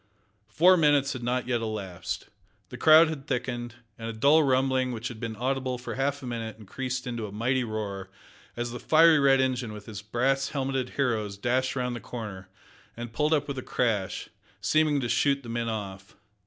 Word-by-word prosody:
Four 175 +12 +5
minutes 145 -3 +3
had 130 - -6
not 125 +1 -1
yet 120 -2 0
elapsed. 100 -6 -4 0.4
The - - -8
crowd 160 +1 +8
had 150 -4 -6
thickened, 120 -2 -3 0.2
and 115 0 -5
a - - -4
dull 140 +8 +5
rumbling 130 -2 +2
which 120 +1 -4
had 120 -3 -9
been 115 -1 -4
audible 130 +2 -1
for 125 - -6
half 140 +1 -1
a - - -5
minute 115 -3 -5
increased 125 +4 -4
into 120 -3 -4
a - - -10
mighty 125 +5 0
roar 100 -4 -4 0.5
as 120 0 -2
the 120 - -6
fiery 160 0 +6
red 135 -1 +5
engine 130 -4 0
with 105 -1 -10
its 105 -3 -7
brass 130 +6 0
helmeted 135 -2 -2
heroes 110 -7 0
dashed 130 +5 0
round 125 -1 -1
the - - -5
corner, 105 -7 -7 0.5
and 120 -1 -7
pulled 150 +5 +1
up 150 -2 +2
with 140 -2 -3
a - - -4
crash, 110 -7 -1 0.3
seeming 150 +7 +2
to 120 - -1
shoot 140 +3 +2
the 120 - -9
men 115 0 -2
off. 100 -2 -6
125 Hz, 195 wpm, -27 LUFS, 110-135 Hz, 0.5 s, crowd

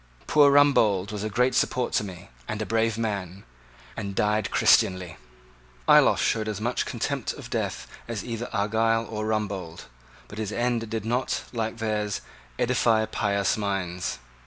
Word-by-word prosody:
"Poor 145 -2 +5
Rumbold 110 -9 +4
was 105 -1 -4
a 110 - -2
great 125 +5 +2
support 125 -1 0
to - - +2
me, 90 -7 -9 0.2
and 110 - -3
a 110 - -2
brave 115 0 +1
man, 100 -4 -3 0.5
and 100 -1 -5
died 105 0 +1
Christianly." 90 -1 +3 0.7
Ayloffe - - +6
showed 110 -1 0
as 105 -2 -3
much 120 +3 -1
contempt - - -2
of - - -10
death - - -2 0.2
as 115 -4 -4
either 120 0 -4
Argyle 115 +2 +1
or 110 -1 -4
Rumbold: 100 -6 -3 0.5
but 105 - -9
his 110 -2 -3
end 120 -1 -1
did 110 -1 -3
not, 125 +3 -1
like 115 -1 -2
theirs, 105 -3 -2 0.4
edify 115 -2 +2
pious 100 -2 0
minds. 95 -4 -2
110 Hz, 155 wpm, -26 LUFS, 100-115 Hz, 0.7 s, Ayloffe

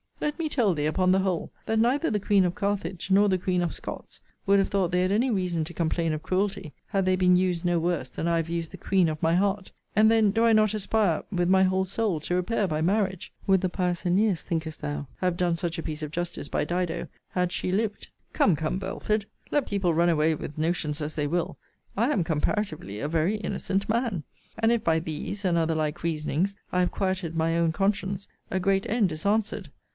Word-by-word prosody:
Let 295 0 -2
me 320 -2 -1
tell 230 -10 +2
thee, 150 -2 -1
upon 185 +4 +2
the 190 - +4
whole, 190 -3 -1 0.2
that 220 - +1
neither 265 +8 +2
the 210 - +1
Queen 200 -1 +3
of 175 0 -1
Carthage, 195 -3 -2
nor 200 +2 +6
the 185 - +2
Queen 180 0 0
of 175 - -1
Scots, - - -8 0.3
would 200 0 +5
have 195 - +2
thought 195 -3 +1
they 180 +1 +2
had 185 +1 +1
any 235 +6 +2
reason 180 -5 0
to 175 - -8
complain 165 0 0
of 155 - -4
cruelty, 185 -4 -1
had 195 -1 0
they 185 0 +3
been 180 -1 +4
used 180 -1 +1
no 175 -1 +2
worse 165 -6 -1
than 165 - -3
I 170 0 +2
have 165 0 -2
used 170 -1 -3
the - - -9
queen 185 -4 +2
of 155 -1 -4
my 165 +1 +3
heart: 195 +1 0 0.2
And 215 +1 +6
then 220 -3 +4
do 225 +3 +2
I 230 - +5
not 215 -1 +4
aspire 205 -4 +1
with 175 -2 +1
my 190 0 +5
whole 190 0 +2
soul 195 -3 -1
to 175 - -2
repair 200 +3 0
by 155 -2 -1
marriage? 190 +1 0
Would 190 -2 +4
the 185 - 0
pious 180 -1 -1
Æneas, 185 +1 +2
thinkest 160 -2 -4
thou, 145 -1 -4
have 180 -2 0
done 175 -2 +1
such 170 -1 -3
a 165 - -4
piece 155 0 -4
of 150 - -4
justice 175 -3 -4
by - - 0
Dido, 175 0 -2 0.2
had 180 -1 0
she 180 - -2
lived? 210 +1 -1 0.3
Come, 190 - +4
come, 160 +4 -2
Belford, 200 +2 -2 0.3
let 290 -2 +1
people 195 -4 +1
run 170 +2 +3
away 160 -1 +3
with 150 -1 -6
notions 155 -1 -1
as 150 +1 -4
they 150 -2 0
will, 170 +3 -1 0.4
I 230 +6 +2
am 195 - +2
comparatively 155 - -2
a 145 - -2
very 165 +6 +1
innocent 200 -1 -2
man. 225 -7 0 0.3
And 225 +1 +3
if 235 -1 +1
by 160 -1 +3
these, 165 +6 -5
and 175 -2 +2
other 165 -1 +1
like 155 -1 -2
reasonings, 165 +4 -1 0.2
I 180 - +1
have 180 - +2
quieted 185 -4 -2
my 165 +1 +1
own 165 -1 +2
conscience, 195 +1 -1 0.2
a 190 - +1
great 195 +1 +1
end 210 -5 +2
is 155 +3 -6
answered. 210 -4 0
180 Hz, 230 wpm, -26 LUFS, 165-200 Hz, 0.4 s, nor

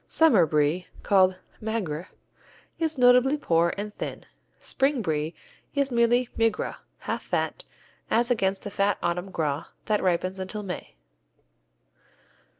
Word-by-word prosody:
Summer 230 - +5
Brie, 150 +4 +1 0.2
called 185 -2 +4 0.2
Maigre, 195 -8 -3 0.7
is 320 -2 0
notably 250 +3 +5
poor 170 - +2
and 205 +1 -4
thin. - - -6 0.3
Spring 270 -3 +1
Brie 155 -1 -1 0.4
is 280 -1 +2
merely 240 +1 +3
Migras, 225 -1 0 0.2
half - - -3
fat, - - -2 0.5
as 235 +2 +2
against 195 -4 +1
the 205 - -6
fat 200 +1 +1
autumn 175 +2 -1
Gras 150 -5 -2 0.2
that 210 -1 +1
ripens 185 +1 0
until 200 +3 -5
May. 180 - -6
200 Hz, 125 wpm, -26 LUFS, 175-240 Hz, 0.7 s, Summer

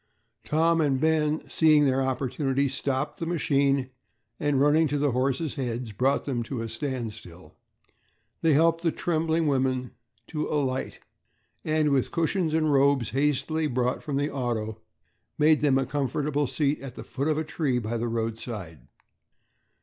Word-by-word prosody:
Tom 165 +2 +2
and 140 -3 +1
Ben, 155 0 +1
seeing 155 -2 +4
their 135 0 +2
opportunity, 135 +1 0
stopped 135 +1 -2
the 165 - -3
machine, 140 -5 +1 0.5
and, 145 -2 +1
running 150 +3 +4
to 145 +1 -1
the 145 -1 +1
horses' 135 +5 0
heads, 125 -4 -4
brought 130 +7 +1
them 130 -4 -1
to 115 0 -4
a 115 - -5
standstill. 110 - -6 0.9
They 160 -2 +4
helped 165 +3 +3
the 170 -2 +1
trembling 160 0 0
women 130 -3 0 0.4
to 155 -1 -2
alight 135 -3 -2 0.6
and 155 -1 +1
with 135 -2 +1
cushions 165 -1 0
and 155 -2 +2
robes 135 -5 +3
hastily 150 +4 0
brought 125 -1 -1
from 145 -3 -3
the 145 +2 -1
auto 110 -4 -3 0.6
made 155 0 +4
them 140 -3 +3
a 135 - +1
comfortable 145 +1 -1
seat 145 +1 0
at 135 -2 -8
the - - -8
foot 140 +2 -3
of 155 -1 +1
a 155 - 0
tree 150 -4 -1
by 115 0 -2
the 120 +1 -2
roadside. 110 - -5
140 Hz, 155 wpm, -26 LUFS, 125-155 Hz, 0.9 s, seeing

